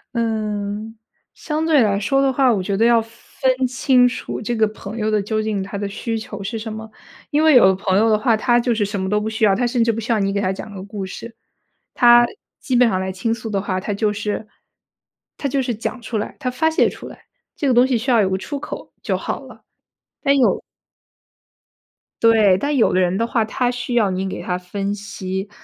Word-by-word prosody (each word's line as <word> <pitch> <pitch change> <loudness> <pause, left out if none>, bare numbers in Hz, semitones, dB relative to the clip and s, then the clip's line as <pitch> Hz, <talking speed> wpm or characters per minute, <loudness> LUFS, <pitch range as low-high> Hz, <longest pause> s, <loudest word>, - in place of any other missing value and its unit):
嗯， 215 -1 -2 0.4
相 310 0 -3
对 310 -4 +4
来 200 -1 +1
说 270 +7 +1
的 270 -1 +2
话， 265 -2 +3
我 200 -5 0
觉 200 +1 -1
得 220 - +2
要 235 0 +5
分 255 +3 -2
清 255 0 +3
楚 245 - -5
这 235 +2 -2
个 220 -1 +3
朋 215 +1 -9
友 215 0 -1
的 210 -1 +2
究 215 +2 -2
竟 215 -2 -2
他 195 +1 -5
的 200 0 -3
需 225 +3 -4
求 210 -2 -7
是 200 +3 -4
什 220 0 -6
么。 220 0 -8 0.4
因 300 +2 +2
为 315 -1 +6
有 245 - +8
的 190 - +3
朋 190 0 -1
友 225 +1 +3
的 215 - +4
话， 225 +1 +2
他 240 +2 +2
就 240 0 +1
是 215 -2 0
什 205 -1 -4
么 190 - -2
都 210 +1 +1
不 220 - -2
需 220 0 +1
要， 200 - +4
他 245 +3 0
甚 240 -1 +1
至 230 - +2
不 225 - -4
需 230 +2 -3
要 225 - +3
你 195 0 0
给 200 - 0
他 185 -1 0
讲 200 +2 -7
个 190 -1 -7
故 200 -1 -6
事。 230 +4 -9 0.6
他 240 0 +6 0.3
基 260 - -2
本 245 -1 +5
上 185 -3 0
来 190 0 -3
倾 190 +5 -2
诉 225 -1 -6
的 195 -2 0
话， 185 -2 -2
他 205 +2 -3
就 210 +1 0
是 210 +1 -4 0.9
他 280 - -2
就 275 0 0
是 245 -2 -2
讲 240 +3 -5
出 225 0 -4
来、 210 - -4
他 255 - -2
发 320 +5 +1
泄 - - +3
出 - - -10
来， - - -14 0.3
这 290 - -2
个 255 - +3
东 245 +1 +6
西 260 -2 0
需 240 +4 -2
要 235 - +5
有 190 - +1
个 190 - +1
出 280 +8 -5
口 - - -8
就 - - 0
好 - - -4
了。 - - -14 0.6
但 280 -1 +3
有 255 - +3 1.6
对。 215 -5 +5
但 290 +7 -1
有 245 - +3
的 185 - +3
人 180 +1 +1
的 230 - +1
话， 230 -1 +1
他 245 +2 -1
需 245 0 -4
要 210 -5 +3
你 190 +1 -2
给 190 - -5
他 180 -1 -2
分 195 +2 -4
析， 195 -1 -5
220 Hz, 260 characters per minute, -20 LUFS, 200-245 Hz, 1.6 s, 有